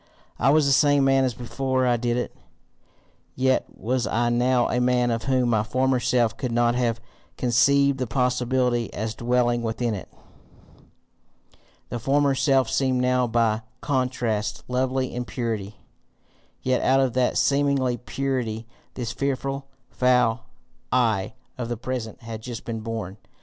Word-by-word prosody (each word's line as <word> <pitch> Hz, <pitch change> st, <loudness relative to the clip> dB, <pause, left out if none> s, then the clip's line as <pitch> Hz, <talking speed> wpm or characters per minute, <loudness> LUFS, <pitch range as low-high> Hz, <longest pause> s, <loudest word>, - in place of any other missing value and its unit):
I 130 Hz, -, +3 dB
was 150 Hz, +1 st, +4 dB
the 140 Hz, -, +3 dB
same 145 Hz, 0 st, +4 dB
man 135 Hz, 0 st, +4 dB
as 125 Hz, -3 st, -2 dB
before 130 Hz, +2 st, -1 dB
I 120 Hz, -1 st, +3 dB
did 120 Hz, 0 st, -1 dB
it, 125 Hz, -, -3 dB, 1.0 s
yet 130 Hz, 0 st, +1 dB
was 125 Hz, +2 st, -2 dB
I 120 Hz, +1 st, +1 dB
now 120 Hz, +1 st, +2 dB
a 125 Hz, -, 0 dB
man 125 Hz, -1 st, +2 dB
of 115 Hz, 0 st, -2 dB
whom 130 Hz, -2 st, +2 dB
my 110 Hz, -3 st, +2 dB
former 130 Hz, +4 st, +1 dB
self 120 Hz, -2 st, +1 dB
could 125 Hz, -3 st, -3 dB
not 120 Hz, 0 st, +2 dB
have 120 Hz, -2 st, 0 dB, 0.4 s
conceived 140 Hz, +3 st, +3 dB
the 130 Hz, -, -1 dB
possibility 125 Hz, 0 st, 0 dB
as 110 Hz, +1 st, -3 dB
dwelling 120 Hz, 0 st, +1 dB
within 115 Hz, 0 st, -1 dB
it. 100 Hz, -, -7 dB, 1.8 s
The 120 Hz, -, -4 dB
former 140 Hz, +3 st, +2 dB
self 135 Hz, -2 st, +2 dB
seemed 130 Hz, +1 st, +1 dB
now 125 Hz, 0 st, +2 dB
by 115 Hz, -1 st, +1 dB, 0.2 s
contrast 125 Hz, -7 st, -1 dB
lovely 130 Hz, +1 st, -1 dB
in 125 Hz, -, -3 dB
purity, 110 Hz, -3 st, -4 dB, 0.9 s
yet 130 Hz, 0 st, +1 dB
out 135 Hz, +1 st, +3 dB
of 130 Hz, -3 st, +1 dB
that 125 Hz, -1 st, +1 dB
seeming 140 Hz, 0 st, +2 dB, 0.2 s
purity 125 Hz, -4 st, -3 dB, 0.3 s
this 120 Hz, -3 st, -3 dB
fearful, 135 Hz, 0 st, -3 dB, 0.2 s
foul 125 Hz, -2 st, +2 dB, 0.5 s
I 110 Hz, -6 st, +1 dB, 0.2 s
of 120 Hz, -1 st, -3 dB
the 120 Hz, -, -2 dB
present 120 Hz, -1 st, -5 dB
had 115 Hz, -1 st, -7 dB
just 120 Hz, -1 st, -7 dB
been 115 Hz, -1 st, -4 dB
born! 110 Hz, -4 st, -5 dB
125 Hz, 150 wpm, -24 LUFS, 115-130 Hz, 1.8 s, was